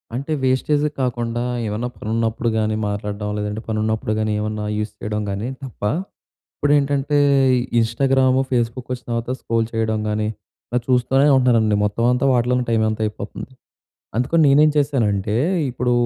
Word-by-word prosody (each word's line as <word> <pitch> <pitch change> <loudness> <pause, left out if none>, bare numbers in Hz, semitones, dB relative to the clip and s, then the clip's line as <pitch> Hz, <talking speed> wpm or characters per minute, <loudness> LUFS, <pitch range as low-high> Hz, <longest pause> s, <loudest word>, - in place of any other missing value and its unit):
అంటే, 140 +5 -4
వేస్టేజ్ 145 +3 +2 0.2
కాకుండా 120 -1 -1 0.2
ఏమన్నా 110 +4 -2
పనున్నప్పుడు 115 +1 -1
గానీ 110 0 0
మాట్లాడడం 105 0 -3
లేదంటే, 105 +1 -3
పనున్నప్పుడు 110 0 -1
గానీ 110 0 0
ఏమన్నా 105 0 -3
యూస్ 105 0 -3
చేయడం 105 0 -3
గానీ 100 +4 -3 0.2
తప్ప 130 - -10 0.7
ఇప్పుడేంటంటే, 145 0 +1 0.6
ఇన్‌స్టాగ్రాము, 130 +3 +2
ఫేస్‌బుక్ 120 +1 -1
వచ్చిన 125 -1 -8
తర్వాత, 115 +1 -2
స్క్రోల్ 115 -1 0
చేయడం 110 -1 0
గానీ, 105 0 -1 0.4
ఇలా 125 +1 +1
చూస్తూనే 130 +3 +3
ఉంటున్నారండి. 115 -4 +3
మొత్తం 105 +3 -1
అంతా 125 +2 0
వాటిలోనే 125 +1 +2
టైమ్ 110 -1 +2
అంతా 110 0 -3
అయిపోతుంది. 105 +4 -6 0.7
అందుకని 140 +7 +2
నేనేం 150 +2 +5
చేశానంటే, 110 -8 +1 0.3
ఇప్పుడు 125 0 -1
115 Hz, 135 wpm, -21 LUFS, 110-130 Hz, 0.7 s, నేనేం